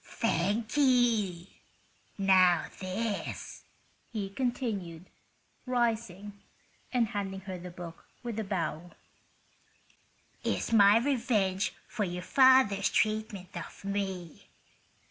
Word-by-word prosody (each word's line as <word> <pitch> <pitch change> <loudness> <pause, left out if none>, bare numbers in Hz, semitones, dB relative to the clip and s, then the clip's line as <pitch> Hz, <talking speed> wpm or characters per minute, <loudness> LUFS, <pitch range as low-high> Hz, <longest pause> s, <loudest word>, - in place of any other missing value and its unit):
"Thank 215 - -1
you. 235 -10 +3 0.7
Now 185 -3 +5
this," 200 +2 -4 0.5
he 205 -4 -4
continued, 205 -8 -3 0.6
rising 225 -5 -1 0.6
and 240 -4 +2
handing 195 -2 -4
her 190 -1 -6
the 180 +1 -8
book 170 -1 -10 0.2
with 235 -2 -4
a - - -1
bow, 175 -3 -3 1.5
"is - - -1
my 205 -1 +7
revenge 230 -7 +1
for 220 - -2
your 180 -1 -4
father's 260 -3 +5
treatment 215 -4 -1
of 175 +3 -8
me. 190 -4 -4
200 Hz, 95 wpm, -30 LUFS, 185-230 Hz, 1.5 s, my